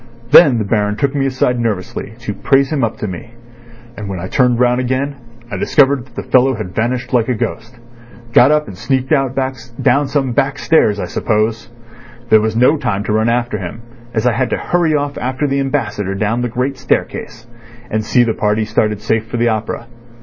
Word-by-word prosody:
Then 140 -8 +8
the 110 - 0
Baron 105 0 0
took 140 +4 0
me 135 -1 0
aside 125 -2 0
nervously 110 -2 -3
to 105 -3 -4
praise 135 +7 +2
him 145 -5 0
up 115 -1 -1
to 105 - -4
me, 105 +6 -8 0.6
and 105 -3 -7
when 95 -2 -4
I 90 - -5
turned 125 -2 +2
round 125 0 +3
again 130 +3 -1 0.4
I - - -3
discovered 140 -3 +2
that 120 - -24
the - - -4
fellow 130 +1 +3
had 105 -5 -6
vanished 125 +5 -2
like 120 -1 +2
a 125 - +1
ghost. 115 +2 -5 0.6
Got 125 - +7
up 150 0 +2
and 95 - -8
sneaked 130 - -1
out 135 -3 +1 0.4
down 140 +3 +2
some 135 -2 0
back 135 +2 0
stairs, 110 -11 +2
I - - -2
suppose. 110 +1 -1 0.6
There 110 - +6
was 110 0 -1
no 125 +7 +4
time 115 -8 -2
to 105 - -2
run 110 +1 +2
after 120 -2 -1
him, 100 +6 -7 0.3
as 110 0 -1
I 125 - +3
had 120 +2 0
to - - -1
hurry 170 -3 +1
off 145 -1 -2
after 130 +3 -2
the 140 -1 0
Ambassador 105 -8 -2
down 110 +4 -1
the 125 - -1
great 130 +3 -2
staircase, 120 -2 -2 0.5
and 110 0 0
see 120 +3 +3
the 115 -2 0
party 105 +1 0
started 105 -1 0
safe 110 +1 -1
for 120 - -4
the 120 0 +2
opera. 110 +1 -3
120 Hz, 210 wpm, -16 LUFS, 110-135 Hz, 0.6 s, Then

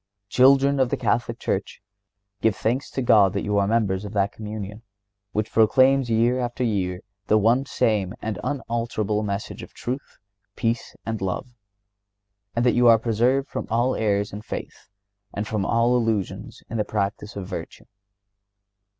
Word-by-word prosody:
Children 135 +2 +5
of 130 -2 +3
the - - -1
Catholic 115 -1 0
Church, - - -3 0.6
give 110 -2 +3
thanks 125 +6 -1
to 130 - -3
God 105 -6 +5
that - - -2
you 105 -1 +1
are 100 - +2
members 100 -3 +1
of 105 0 -7
that 100 -1 +1
Communion, 105 -1 -7 0.5
which 105 0 -2
proclaims 130 +3 +4
year 115 +3 +2
after 120 +1 -2
year 95 -5 -1 0.3
the 110 - +4
one 120 +6 +3
same 105 -3 0
and 105 -4 -4
unalterable 115 -6 -1
message 100 -1 -4
of - - -12
truth, 130 +4 -5 0.4
peace 115 0 -2
and 110 -2 -3
love, 95 +6 -3 1.0
and 120 +1 +1
that 125 - +4
you 120 0 +4
are 115 -1 +8
preserved 120 +5 +1
from - - -5
all 120 +3 +1
errors 100 -2 0
in 105 - -6
faith, 105 - -8 0.5
and 105 +2 -3
from 105 -3 -1
all 115 +1 +3
illusion 110 -6 -1 0.2
in 115 - -4
the 105 - +1
practice 105 +1 -3
of 100 -2 -5
virtue. - - -7
110 Hz, 160 wpm, -24 LUFS, 105-120 Hz, 1.0 s, are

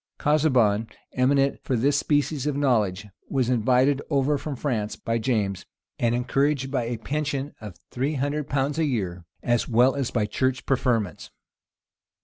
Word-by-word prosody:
Casaubon, 130 -8 +2 0.3
eminent 135 +2 +2
for 130 - -1
this 140 +5 +2
species 145 -1 0
of 145 - 0
knowledge, 105 -8 +1 0.2
was 130 -3 +1
invited 130 +4 +3
over 140 0 +2
from 145 0 -4
France 115 -6 -2
by 115 0 -2
James, 105 -6 -1 0.3
and 120 0 +2
encouraged 135 +2 0
by 130 -4 0
a 120 0 -3
pension 145 +3 -3
of 105 -5 -9
three 135 +5 -1
hundred 145 +2 -2
pounds 140 +2 0
a 160 - +2
year, 95 - -2 0.2
as 120 -1 +1
well 125 +3 +4
as 135 -3 -2
by 110 -4 0
church 130 +5 -1
preferments. 115 - 0
130 Hz, 150 wpm, -25 LUFS, 115-140 Hz, 0.3 s, well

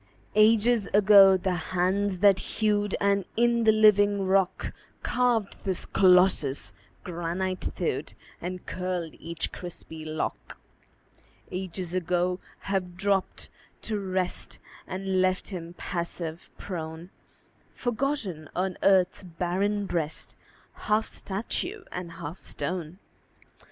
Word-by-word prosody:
Ages 220 +1 +4
ago 200 -2 +8
the 185 0 -1 0.2
hands 190 +2 +1
that 200 -2 +6
hewed, 205 -2 0
And 200 0 +2
in 235 0 +3
the 220 - +7
living 205 -2 +5
rock 190 -1 +1 0.3
Carved 240 -5 0
this 190 -3 -2
Colossus, 180 -7 +4 0.3
granite 180 +2 -3
thewed - - -3 0.3
And 180 +1 -5
curled 180 -3 -3
each 165 -1 -4
crispy 165 -3 -8
lock: 155 0 -4 0.9
Ages 185 -1 -4
ago 180 0 0 0.2
have 185 -3 -2
dropped 195 0 0 0.4
to 215 -2 -2
rest 185 -2 -2 0.3
And 190 0 -1
left 185 0 +1
him 175 -3 -7
passive, 170 -1 -4
prone, 165 -1 -6 0.6
Forgotten 230 - -2
on 185 0 -1
earth's 190 -2 +4
barren 190 +4 -1
breast, 160 -4 -3 0.5
Half 215 +1 +3
statue 345 - -3
and 175 -2 -6
half 165 +1 -7
stone. 180 -2 -4
185 Hz, 105 wpm, -27 LUFS, 175-205 Hz, 0.9 s, ago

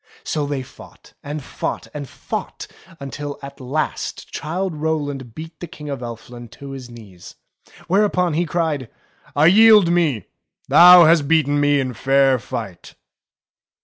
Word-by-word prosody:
So 150 -2 -2
they 140 -2 -3
fought, - - -16
and 145 0 -6
fought, - - -5
and 145 -3 -7
fought, - - -6 0.3
until 145 +1 -6
at 140 - -10
last 140 +4 -4
Childe 175 +3 -3
Rowland 145 -6 -3
beat 160 0 -10
the 175 - -7
King 150 -4 -9
of 140 - -4
Elfland 120 0 -9
to 140 -1 -10
his 130 -3 -9
knees. 105 -7 -13 0.5
Whereupon 180 -2 +1
he 170 +3 0
cried, 155 -7 -2 0.5
I 145 +2 +4
yield 210 0 +6
me. 160 -10 +1 0.4
Thou 180 0 +9
hast 160 -3 +4
beaten 145 -2 +2
me 145 0 +3
in 130 -2 -2
fair 135 +1 +2
fight." 100 -6 -8
145 Hz, 145 wpm, -20 LUFS, 130-165 Hz, 0.5 s, Thou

